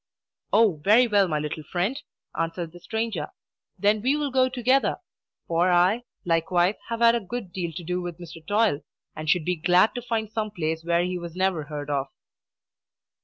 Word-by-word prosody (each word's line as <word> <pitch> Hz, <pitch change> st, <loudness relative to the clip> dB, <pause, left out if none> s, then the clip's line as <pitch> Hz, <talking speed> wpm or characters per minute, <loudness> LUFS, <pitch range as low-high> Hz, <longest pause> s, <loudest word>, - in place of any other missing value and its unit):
"Oh, 205 Hz, -8 st, +3 dB
very 225 Hz, +5 st, +6 dB
well, 205 Hz, -4 st, +3 dB
my 155 Hz, -3 st, -1 dB
little 150 Hz, +1 st, -4 dB
friend!" 185 Hz, -, -2 dB, 0.3 s
answered 165 Hz, 0 st, -3 dB
the 175 Hz, -, -13 dB
stranger. 220 Hz, -6 st, -3 dB, 0.5 s
"Then 205 Hz, +1 st, +2 dB
we 265 Hz, +5 st, +2 dB
will 295 Hz, -2 st, -1 dB
go 260 Hz, 0 st, +3 dB
together; 255 Hz, +2 st, +2 dB, 0.5 s
for 170 Hz, +2 st, +2 dB
I, 185 Hz, +7 st, +3 dB, 0.2 s
likewise, 175 Hz, +2 st, +2 dB, 0.2 s
have 230 Hz, 0 st, -3 dB
had 230 Hz, 0 st, +7 dB
a 235 Hz, -, +1 dB
good 210 Hz, -3 st, -6 dB
deal 175 Hz, -3 st, -3 dB
to 175 Hz, -, -7 dB
do 180 Hz, +2 st, -2 dB
with 175 Hz, -2 st, -6 dB
Mr. 165 Hz, -2 st, -11 dB
Toil, 205 Hz, -7 st, +2 dB, 0.3 s
and 155 Hz, 0 st, -5 dB
should 160 Hz, -1 st, +2 dB
be 180 Hz, -, +1 dB
glad 180 Hz, +6 st, +4 dB
to 245 Hz, -, -4 dB
find 225 Hz, -3 st, -2 dB
some 215 Hz, -1 st, -2 dB
place 160 Hz, -4 st, -3 dB
where 170 Hz, +1 st, +2 dB
he 180 Hz, 0 st, -2 dB
was 170 Hz, -1 st, -8 dB
never 185 Hz, -5 st, 0 dB
heard 145 Hz, -1 st, -5 dB
of." 140 Hz, -1 st, 0 dB
180 Hz, 185 wpm, -25 LUFS, 165-220 Hz, 0.5 s, had